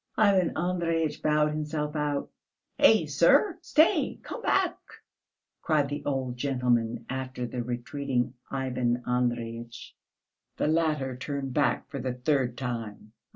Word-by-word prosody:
Ivan 195 -5 +3
Andreyitch 165 -3 0
bowed 150 0 +3
himself 150 0 -3
out. 150 -1 -1 0.5
"Hey, - - +6
sir! 365 -5 +4
Stay, 315 -1 +3
come - - -6
back," - - +1 0.8
cried 150 -3 +1
the 145 +1 -4
old 130 -3 -2
gentleman, 125 -3 0
after 130 -1 -4
the 120 +1 -4
retreating 125 +1 -2 0.2
Ivan 125 -2 -1
Andreyitch. 120 -1 -2 0.6
The - - 0
latter 155 -5 +1
turned 135 0 -4
back 145 +1 +1
for 140 - -6
the 130 -1 -2
third 125 -2 0
time. 115 -4 -5
135 Hz, 120 wpm, -28 LUFS, 125-150 Hz, 0.8 s, Hey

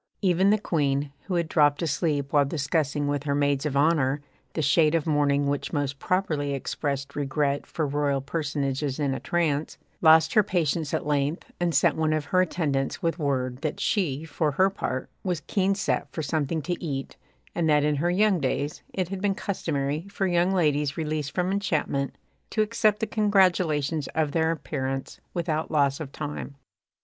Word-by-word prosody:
Even 185 +1 +4
the 210 - +5
Queen, 145 -7 0
who 185 - -2
had 170 -2 +1
dropped 145 -1 +3
asleep 150 -3 -1
while 145 -1 +5
discussing 145 0 -1
with 145 0 -1
her 140 -1 +1
maids 145 0 +1
of 140 -2 -1
honour 145 -2 +3 0.3
the 160 - -1
shade 155 +2 +4
of 165 - 0
mourning 145 -2 +2
which 140 0 -1
most 145 -2 -2
properly 155 -7 0
expressed 140 0 -3
regret 145 0 -1
for 160 - -2
royal 145 -1 0
personages 145 -1 -2
in 140 -2 +1
a 130 - -3
trance, 155 +1 -1 0.2
lost 160 0 +6
her 215 - +6
patience 165 -6 0
at - - -1
length, 145 +2 -1
and 175 -2 0
sent - - +4
one 155 -1 +1
of 155 -2 -1
her 185 +4 +3
attendants 145 -7 -1
with 165 +1 0
word 130 -4 -1
that 150 +2 -3
she, 160 -9 0
for 155 -1 -1
her 190 +7 +3
part, 130 -8 -3 0.2
was 180 -4 -1
keen 195 +2 +1
set 200 - -1
for 160 - -4
something 155 +1 -1
to 175 +4 -3
eat, 135 -4 -4 0.4
and 165 -2 0
that 150 -1 +4
in 150 -1 +1
her 170 +5 +1
young 195 +1 +3
days 145 +1 -2
it 185 -3 -1
had 195 -1 -4
been 200 -1 +1
customary 155 -4 -2
for 200 -1 -2
young 175 0 +2
ladies 150 -5 +1
released 155 -2 -2
from 180 0 +1
enchantment 155 -8 -1 0.3
to 215 - +2
accept 215 -1 +1
the - - +2
congratulations 180 - +2
of 155 -2 +1
their 165 +1 +1
parents 135 -3 -4
without 160 -2 -1
loss 140 -3 +2
of 150 -4 -6
time. 145 -1 -6
150 Hz, 180 wpm, -26 LUFS, 140-175 Hz, 0.4 s, lost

